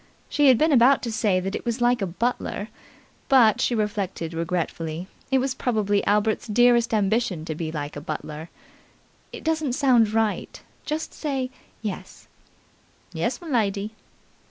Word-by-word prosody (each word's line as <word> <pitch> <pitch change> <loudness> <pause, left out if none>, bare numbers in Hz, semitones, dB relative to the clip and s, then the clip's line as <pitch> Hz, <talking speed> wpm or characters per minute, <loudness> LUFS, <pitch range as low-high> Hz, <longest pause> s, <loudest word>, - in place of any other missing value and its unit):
She 290 -1 +3
had 255 -3 +7
been 315 +4 +3
about 260 +1 +5
to 235 - -2
say 210 -4 +1
that 190 +2 -4
it - - -4
was 235 +1 -2
like 240 -1 +2
a 195 - 0
butler, 215 +2 -2 0.6
but, 240 -6 +5
she 240 - +1
reflected 200 -6 -2
regretfully, 165 0 -3 0.2
it 265 - +3
was 260 0 0
probably 210 -5 0
Albert's 210 +3 +1
dearest 240 +1 +4
ambition 210 -5 0
to 160 - -3
be 155 0 -4
like 145 -2 -5
a 145 - -6
butler. 155 +1 -6 0.8
"It - - -9
doesn't 315 -5 0
sound 245 -6 +4
right. 220 -1 -1 0.3
Just 305 +1 -3
say 270 -4 -3 0.3
'Yes'." 190 -3 -6 0.9
"Yes, - - -1
m'lady." 215 - -1
220 Hz, 150 wpm, -24 LUFS, 185-250 Hz, 0.9 s, had